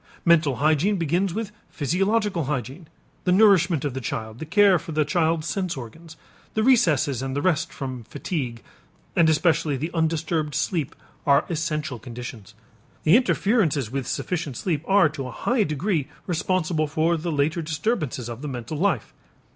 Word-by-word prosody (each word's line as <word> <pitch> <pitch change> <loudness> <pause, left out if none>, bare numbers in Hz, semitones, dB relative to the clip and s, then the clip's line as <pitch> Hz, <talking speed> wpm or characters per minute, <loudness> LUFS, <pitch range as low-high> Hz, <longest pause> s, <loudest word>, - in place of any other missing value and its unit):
Mental 160 -5 +4
hygiene 155 +8 +2
begins 175 +3 0
with 215 +3 -4 0.2
physiological 190 - 0
hygiene. 135 +4 -4 0.4
The 180 - +3
nourishment 180 -6 +4
of 140 - -2
the 130 - -4
child, 110 0 -5
the 160 - -6
care 195 0 +5
for 160 - -8
the 155 0 +2
child's 160 +1 +1
sense 185 -5 -2
organs, 160 +7 -10 0.4
the 215 - +2
recesses 160 - +3
and 135 0 -3
the 145 - 0
rest 175 -5 +1
from 130 -4 -6
fatigue, 130 - -4 0.5
and 165 -2 +5
especially 155 -2 +2
the 155 +6 -3
undisturbed 160 -2 0
sleep 160 -8 -1 0.3
are 140 0 +5
essential 150 -6 -2
conditions. 120 -3 -9 0.5
The 160 - +6
interferences 195 - +2
with 135 -2 -3
sufficient 160 -8 -3
sleep 160 -5 -1
are 195 -4 +5
to 140 -4 -6
a - - -7
high 240 - 0
degree 155 0 -1 0.2
responsible 170 -2 0
for 160 +3 +1
the 165 +1 -3
later 155 +3 0
disturbances 155 - -2
of 120 +1 -7
the 150 - -5
mental 130 +3 -5
life. 175 - 0
155 Hz, 160 wpm, -24 LUFS, 140-180 Hz, 0.5 s, The